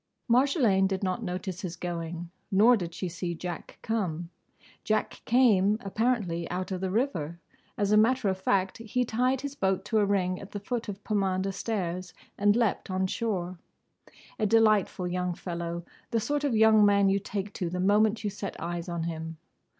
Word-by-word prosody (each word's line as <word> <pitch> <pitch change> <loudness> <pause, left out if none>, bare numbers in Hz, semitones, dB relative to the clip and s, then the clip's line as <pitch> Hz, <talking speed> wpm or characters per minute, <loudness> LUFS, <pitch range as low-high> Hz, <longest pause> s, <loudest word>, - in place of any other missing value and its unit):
Marjolaine 240 - +4
did 190 0 -2
not 185 +4 -1
notice 185 -2 -4
his 180 -3 -4
going. 170 -1 -5 0.2
Nor 215 +6 +6
did 175 -6 -4
she 185 - -3
see 170 0 -4
Jack 175 0 -6
come. 175 -7 -2 0.5
Jack 215 0 -1
came 215 -5 +4
apparently 200 -6 -1
out 185 +2 -3
of 185 -1 -3
the 190 - -1
river. 185 - -1 0.4
As 205 0 +1
a 210 - +6
matter 230 +1 +3
of 190 -1 -1
fact 190 +1 +1
he 230 +2 -1
tied 250 +3 +1
his 285 0 -4
boat 190 -6 0
to 215 +1 +2
a 205 - +4
ring 185 -2 0
at 200 - -11
the 205 - -3
foot 230 +2 -3
of 200 0 -7
Pomander 195 -2 0
Stairs 185 -4 -3 0.2
and 205 +1 +3
leaped 230 -5 0
on 190 0 0
shore. 185 -4 -2 0.8
A 215 - +2
delightful 215 -4 +3
young 180 0 -1
fellow, 170 -1 -4 0.3
the 230 - +1
sort 290 +6 -1
of 275 -5 +1
young 220 -1 +6
man 200 -1 +5
you 195 +1 +2
take 200 0 -4
to, 175 - -3
the 180 +1 -3
moment 210 +4 +3
you 205 - -1
set 200 0 -6
eyes 170 +1 -4
on 170 -1 -2
him. 165 -1 -5
195 Hz, 180 wpm, -28 LUFS, 180-220 Hz, 0.8 s, Nor